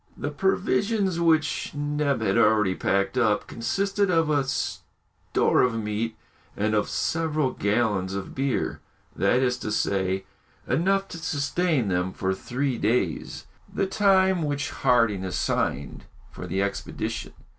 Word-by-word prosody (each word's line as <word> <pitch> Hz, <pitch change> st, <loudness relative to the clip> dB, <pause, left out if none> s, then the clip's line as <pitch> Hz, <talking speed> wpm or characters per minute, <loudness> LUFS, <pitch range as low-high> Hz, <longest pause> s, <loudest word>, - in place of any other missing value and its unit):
The 145 Hz, -, -3 dB
provisions, 195 Hz, +2 st, +1 dB
which 160 Hz, -3 st, +1 dB
Neb 145 Hz, -3 st, 0 dB
had 100 Hz, -3 st, +1 dB
already 105 Hz, -4 st, +4 dB
packed 100 Hz, +6 st, 0 dB
up, 110 Hz, -4 st, +2 dB
consisted 195 Hz, -, -1 dB
of 165 Hz, -3 st, +2 dB
a 145 Hz, -2 st, +3 dB
store 135 Hz, -, -1 dB
of 125 Hz, -2 st, +2 dB
meat 110 Hz, +1 st, -2 dB, 0.4 s
and 105 Hz, +1 st, 0 dB
of 105 Hz, -1 st, +1 dB
several 155 Hz, -4 st, 0 dB
gallons 100 Hz, -3 st, 0 dB
of 100 Hz, -, -5 dB
beer, 135 Hz, -1 st, -1 dB, 0.4 s
that 125 Hz, +2 st, +2 dB
is 125 Hz, -1 st, +1 dB
to 105 Hz, -, -4 dB
say, 95 Hz, -2 st, 0 dB, 0.4 s
enough 195 Hz, +8 st, +1 dB
to 165 Hz, -, -7 dB
sustain 145 Hz, -, 0 dB
them 90 Hz, 0 st, 0 dB
for 95 Hz, 0 st, -1 dB
three 125 Hz, +5 st, -2 dB
days, 105 Hz, -9 st, -1 dB, 0.3 s
the 195 Hz, -, 0 dB
time 190 Hz, -2 st, +3 dB
which 145 Hz, -2 st, -2 dB
Harding 115 Hz, -7 st, +2 dB
assigned 70 Hz, -7 st, -2 dB, 0.3 s
for -, -, -8 dB
the 95 Hz, +1 st, 0 dB
expedition. 100 Hz, -, -4 dB
130 Hz, 135 wpm, -25 LUFS, 105-160 Hz, 0.4 s, already